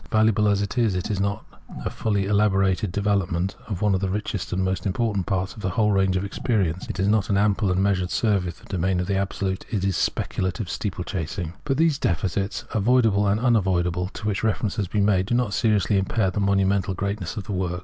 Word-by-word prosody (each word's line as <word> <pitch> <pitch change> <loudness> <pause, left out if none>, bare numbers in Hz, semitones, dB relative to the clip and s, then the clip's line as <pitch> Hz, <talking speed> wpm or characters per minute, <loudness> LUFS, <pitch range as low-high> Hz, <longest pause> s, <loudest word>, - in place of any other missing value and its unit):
Valuable 110 -1 +3
as 100 0 +2
it 100 +4 -2
is, 110 -5 +2
it 90 +4 -2
is 100 - -1
not 100 +1 -1 0.4
a - - 0
fully 100 -3 -1
elaborated 95 -1 +2
development 95 -2 0
of 100 -2 -3
one 105 -2 +3
of 95 - 0
the 95 - 0
richest 105 -1 -3
and 95 +1 0
most 95 +2 -1
important 100 -1 -1
parts 95 0 -1
of 105 - -11
the 95 - -1
whole 105 +3 +2
range 95 -2 +2
of 95 - -2
experience: 95 -5 -1
it - - -4
is 95 - +2
not 105 -1 +2
an 100 - +2
ample 100 -1 +2
and 95 +1 +1
measured 95 -3 +1
survey 100 -1 +1
of 85 - -6
the - - -18
domain 95 -1 0
of 90 - -1
the 100 - -1
Absolute; 95 -1 -2
it 100 -5 -1
is 95 -2 +1
speculative 95 +1 -1
steeplechasing. 90 -3 -4
But 135 -2 0
these 160 -3 +2
defects, 95 +4 -1
avoidable 110 -2 +3
and 100 +2 +2
unavoidable, 90 -7 +1
to - - -7
which 105 -1 -1
reference 110 -2 0
has 100 -4 -1
been 100 +2 +1
made, 95 -2 +2
do 120 - +1
not 120 -4 0
seriously 105 -3 +2
impair 95 0 0
the 100 - -2
monumental 100 0 +1
greatness 100 +4 -3
of 105 - -3
the 105 - -7
work. 90 -1 -2
100 Hz, 220 wpm, -24 LUFS, 95-105 Hz, 0.4 s, Valuable